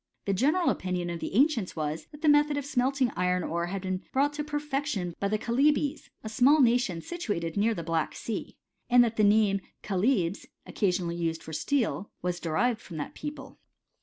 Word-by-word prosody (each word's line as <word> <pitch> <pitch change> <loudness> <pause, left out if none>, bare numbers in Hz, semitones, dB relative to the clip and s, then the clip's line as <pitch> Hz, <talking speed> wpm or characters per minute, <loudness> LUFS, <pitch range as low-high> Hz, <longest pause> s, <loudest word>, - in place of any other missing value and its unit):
The 200 - +1
general 305 - +2
opinion 180 -2 -2
of 170 - -4
the - - -5
ancients 250 - +2
was, 155 0 -3
that 295 +1 -15
the - - +2
me 295 0 +7
thod 295 -1 -3
of 285 - -3
smelting 265 -2 +1
iron 180 0 +1
ore 170 +1 -2
had 195 +1 -4
been 185 0 -2
brought 285 +2 +2
to 295 0 -3
perfec 295 -1 -2
tion 180 - -2
by 200 - 0
the 215 +2 0
Chalybes, 280 +6 +1
a - - -5
small 255 +7 +4
nation 235 - +2
situated 205 - -3
near 220 +2 +2
the 170 - -4
Black 165 -1 -1
Sea,* 225 - -5 0.3
and 245 0 +7
that 230 -1 -1
the 215 - +2
name 205 -1 +4 0.2
chalybs, 195 -2 0 0.2
occasionally 180 -3 -1
used 165 -1 -2
for 160 - -9
steel, 210 - -1
was 180 -1 -1
derived 215 +9 0
from 170 - -9
that 145 - -5
people. 295 0 -8
215 Hz, 195 wpm, -28 LUFS, 180-275 Hz, 0.3 s, me